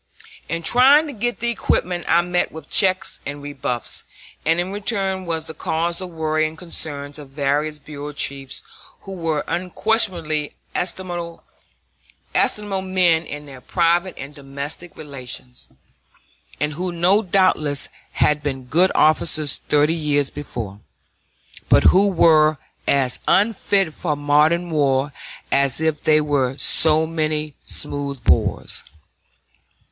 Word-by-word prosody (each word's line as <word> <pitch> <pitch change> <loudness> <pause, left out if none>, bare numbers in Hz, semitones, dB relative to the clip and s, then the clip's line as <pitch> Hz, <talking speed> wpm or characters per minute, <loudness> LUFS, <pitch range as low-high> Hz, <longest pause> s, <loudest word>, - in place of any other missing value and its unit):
In 165 0 -3
trying 270 - +5
to 295 - -6
get 240 +1 -3
the 235 0 +1
equipment 180 -5 -1
I 170 - +4
met 180 0 0
with 160 - -11
checks 185 -2 +2
and 145 +1 -5
rebuffs, 140 -4 -5 0.4
and 165 +2 +2
in 180 +2 -2
return 195 -3 -2
was 160 -1 -2
the 160 - -8
cause 170 +3 -2
of 185 - -5
worry 155 -1 0
and 160 +1 -10
concern 145 -4 -5
to 150 0 -10
various 145 +2 -1
bureau 145 0 -8
chiefs 140 -1 -5 0.4
who 195 - -10
were 165 -5 -2
unquestionably 175 -3 0 0.2
estimable 175 -2 -4 1.0
men 185 -5 0
in 145 0 -7
their 135 -3 -11
private 175 +3 +1
and 140 +2 -8
domestic 140 +4 -7
relations, 130 -3 -8 0.9
and 150 0 -1
who 180 +4 +2
doubtless 180 -8 +1 0.3
had 150 0 +2
been 135 -3 -4
good 170 +9 +3
officers 155 -1 +3
thirty 150 +2 +4
years 145 -4 0
before, 115 -9 -6 0.9
but - - +5
who 195 +2 +5
were 155 -4 +4 0.3
as 135 -3 +2
unfit 200 -4 +2
for 150 -2 -2
modern 150 +4 +2
war 140 -2 +1 0.4
as 140 -1 +3
if 160 -2 -1
they 155 0 +4
were 140 -3 0
so 155 +2 +4
many 155 -2 -2
smooth 140 -3 -3
bores. 80 - +1
155 Hz, 125 wpm, -21 LUFS, 145-180 Hz, 1.0 s, trying